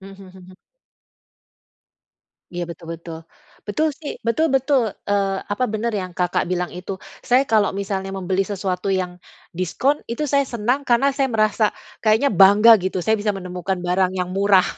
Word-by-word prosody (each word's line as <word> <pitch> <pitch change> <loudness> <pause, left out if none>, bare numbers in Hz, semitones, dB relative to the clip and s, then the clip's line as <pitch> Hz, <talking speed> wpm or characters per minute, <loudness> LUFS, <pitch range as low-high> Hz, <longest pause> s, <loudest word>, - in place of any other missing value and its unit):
Mhm 195 0 -12
mhm. 185 0 -14 2.0
Iya, 175 0 -2
betul 170 0 -10
betul, 165 0 -9 0.5
betul 305 +10 +1
sih, 300 - -5
betul 315 +8 +2
betul, 270 +1 +3 0.3
eee, 195 -1 +1 0.2
apa 230 +5 0
bener 230 +2 -1
yang 185 -1 -6
Kakak, 180 -1 0
bilang 180 -1 -1
itu. 180 +2 -6 0.3
Saya 255 +2 +4
kalau 215 -5 +2
misalnya 195 -1 -3
membeli 190 0 -1
sesuatu 190 -1 -3
yang 180 -2 -2 0.4
diskon 260 - +1
itu 235 +6 -2
saya 280 0 +4
senang 240 +4 0
karena 240 +3 +4
saya 275 -1 +1
merasa 215 -2 +1 0.4
kayaknya 220 +5 +3
bangga 200 +5 +7
gitu. 190 - -2
Saya 220 0 +3
bisa 210 0 0
menemukan 180 0 -4
barang 185 +1 +1
yang 180 -1 -2
murah. 195 -2 +4
195 Hz, 155 wpm, -21 LUFS, 185-230 Hz, 2.0 s, bangga